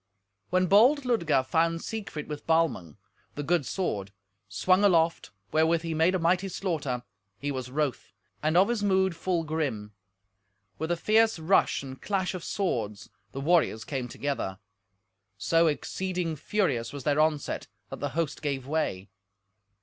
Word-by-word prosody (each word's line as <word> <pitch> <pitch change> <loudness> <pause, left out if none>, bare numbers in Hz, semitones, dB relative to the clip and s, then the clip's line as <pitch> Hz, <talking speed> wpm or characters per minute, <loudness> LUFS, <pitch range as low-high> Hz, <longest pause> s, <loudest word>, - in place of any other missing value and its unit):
When 185 0 +2
bold 235 - +5
Ludger 165 - +2
found 165 +4 +1
Siegfried 205 -9 -5
with 150 -1 -7
Balmung, 155 - +1 0.4
the 145 - -3
good 165 -3 +1
sword, 105 - -2 0.4
swung 185 - +2
aloft, 170 -4 +3 0.2
wherewith 160 +1 +2
he 165 -1 -2
made 165 +4 +3
a - - +3
mighty 180 +3 +1
slaughter, 150 -11 -2 0.3
he 145 +1 -3
was 130 -2 -4
wroth, 140 -1 -2 0.3
and 155 +3 +2
of 190 +2 +6
his 240 -3 0
mood 190 -3 +2
full 170 0 -1
grim. 140 -10 -3 0.9
With 160 - -2
a 175 - +1
fierce 220 +3 +3
rush 160 -2 +2
and 130 -1 -9
clash 190 -2 -1
of 180 -2 -6
swords 115 - -2 0.2
the 135 - -5
warriors 155 -8 +2
came 130 +1 -4
together. 130 -8 -3 0.8
So 165 +10 +3
exceeding 175 +2 -2
furious 140 - -1
was 140 -2 -7
their 145 +1 +1
onset 155 -2 0 0.2
that - - -6
the - - -2
host 165 -3 -1
gave 140 -3 -2
way. 135 -11 -2
160 Hz, 150 wpm, -28 LUFS, 135-185 Hz, 0.9 s, of